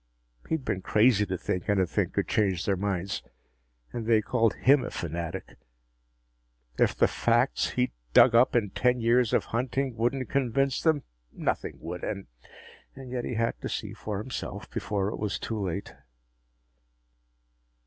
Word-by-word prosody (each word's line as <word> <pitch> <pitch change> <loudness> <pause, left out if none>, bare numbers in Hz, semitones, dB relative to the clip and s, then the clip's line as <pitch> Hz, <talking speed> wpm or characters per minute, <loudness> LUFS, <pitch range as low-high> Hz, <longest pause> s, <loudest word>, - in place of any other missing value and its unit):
He'd 160 -5 -1
been 95 - -1
crazy 105 +1 +3
to 95 0 -2
think 90 +3 -3
anything 95 -5 +1
could - - -1
change 95 -5 +1
their 100 - +2
minds. 95 0 -2 0.7
And 115 -2 -4
they 115 -2 +5
called 115 -2 +2
him 135 0 +4
a - - -4
fanatic! 85 +2 -5 1.2
If - - +3
the - - +4
facts 120 +3 +1
he'd 125 0 0 0.2
dug 120 - +7
up 120 +2 +5
in 105 -5 +2
ten 125 0 +2
years 120 0 +3
of - - +2
hunting 130 +2 -1
wouldn't 120 +3 0
convince 135 0 +1
them, 160 -4 +2 0.3
nothing - - -2
would. 85 +2 -6
And 100 -2 -3 0.7
yet 130 -2 -4
he 125 - -3
had 115 +1 -1
to - - -4
see - - -4
for 105 -2 -5
himself, 115 +5 -5
before 100 -1 -1
it - - -6
was 105 -1 -1
too 110 -3 -3
late! 95 +1 -4
115 Hz, 150 wpm, -28 LUFS, 100-125 Hz, 1.2 s, dug